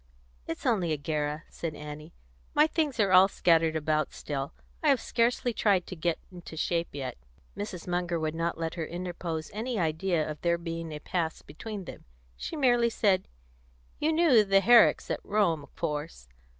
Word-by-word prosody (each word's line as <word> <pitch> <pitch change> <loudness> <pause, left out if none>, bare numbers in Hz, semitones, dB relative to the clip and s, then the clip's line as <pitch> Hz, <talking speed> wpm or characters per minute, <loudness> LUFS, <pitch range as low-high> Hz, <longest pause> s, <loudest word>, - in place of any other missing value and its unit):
"It's 165 - -5
only 195 -10 +2
a - - -1
Guerra," 150 +1 -2
said 160 -3 -5
Annie. 150 +2 -8 0.4
"My 300 - +6
things 310 -5 -1
are 200 -3 +3
all 185 +1 +8
scattered 165 -4 +3
about 155 -1 0
still; 140 -2 -4 0.3
I 310 - +3
have 275 -3 +4
scarcely 240 +2 +1
tried 200 -5 +2
to 185 - -7
get 170 0 0
into 175 -3 -10
shape 170 +1 0
yet." 130 - -5 0.4
Mrs. 195 -4 -6
Munger 175 -1 -1
would 155 -1 -1
not 165 0 -2
let 165 0 -3
her 165 -2 -3
interpose 170 -2 -4
any 230 +3 -3
idea 165 -1 0
of 155 -1 -6
there 170 0 +2
being 165 -1 -5
a 150 - -5
past 160 +1 -3
between 205 +3 -7
them. - - -10 0.3
She 320 - -6
merely 240 -5 +3
said: 195 -4 +1 0.7
"You 310 - +2
knew 315 -9 +5
the 195 -1 +4
Herricks 235 +1 +5
at - - -3
Rome, 195 -7 +1
of 140 - -16
course. 150 - -4
170 Hz, 175 wpm, -29 LUFS, 160-210 Hz, 0.7 s, all